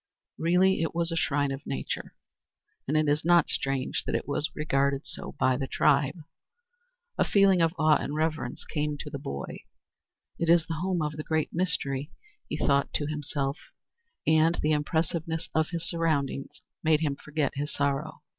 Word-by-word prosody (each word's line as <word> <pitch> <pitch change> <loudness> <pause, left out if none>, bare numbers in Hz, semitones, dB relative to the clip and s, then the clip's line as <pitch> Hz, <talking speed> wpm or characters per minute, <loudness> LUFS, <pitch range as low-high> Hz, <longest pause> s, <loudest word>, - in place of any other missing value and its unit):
Really 180 +2 +3
it 165 0 -1
was 170 0 +1
a - - -1
shrine 145 -3 +1
of 135 +1 -6
nature, 135 - -4 0.7
and 150 +3 +2
it 155 0 +2
is 145 +1 +2
not 170 -1 +5
strange 135 -1 -1
that - - -1
it - - -2
was 145 +1 +1
so - - -23
regarded 140 -2 +1 0.3
by 130 -1 +3
the 135 - -2
tribe. 145 +4 +2 1.0
A - - +6
feeling 195 -3 +4
of 165 +1 +2
awe 155 -1 +5
and 145 - -3
reverence 155 -5 -2
came 150 -1 -2
to 150 +1 -7
the 140 - -4
boy. 70 - -5 0.8
"It 170 - 0
is 170 -1 +5
the 165 - -3
home 180 -3 0
of 150 0 -3
the 155 - -4
Great 160 -1 -1
Mystery," 150 -5 -1 0.4
he 150 - -2
thought 140 -2 +2
to 145 - 0
himself; 145 -1 -2 0.7
and 160 +2 +4
the 155 - +2
impressiveness 160 +2 -1
of 160 0 +2
his 170 -1 -3
surroundings 155 -5 -1 0.2
made 155 -1 +3
him 145 -3 0
forget 150 0 -2
his 145 +1 -3
sorrow. 140 +2 -2
155 Hz, 175 wpm, -28 LUFS, 140-165 Hz, 1.0 s, A